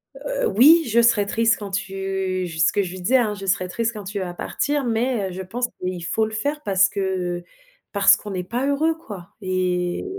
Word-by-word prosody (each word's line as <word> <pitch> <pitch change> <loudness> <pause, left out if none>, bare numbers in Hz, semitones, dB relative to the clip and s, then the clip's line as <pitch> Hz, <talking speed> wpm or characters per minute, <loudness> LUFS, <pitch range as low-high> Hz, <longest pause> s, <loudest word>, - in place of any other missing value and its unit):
Heu, - - -3
oui: 320 - +6
«Je 235 +1 +4
serai 230 -3 +4
triste 225 +2 +2
quand 205 -2 -7
tu» 190 -1 -2
j 160 -2 -7
ce 165 - +4
que 205 - +1
je 180 - -4
lui 185 0 -8
disais 250 +9 +3
hein: 225 -4 +1
«Je 200 -1 -8
serai 185 -1 0
triste 230 +5 -2
quand 210 - -7
tu 200 +1 -4
vas 180 -2 -4
partir 290 +10 -2
mais, 230 -2 0
heu, - - -7
je 185 - -6
pense 235 +7 -2
qu'il 180 -1 -3
faut 220 +5 +1
le 220 - -6
faire 285 +7 -2
parce 195 0 +3
que 185 -3 -2 0.5
parce 200 -1 +6
qu'on 205 - -8
n'est 180 -1 -3
pas 240 +8 -2
heureux 310 +3 +1
quoi» 205 - -10
et 180 - -1
200 Hz, 225 wpm, -22 LUFS, 185-235 Hz, 0.5 s, oui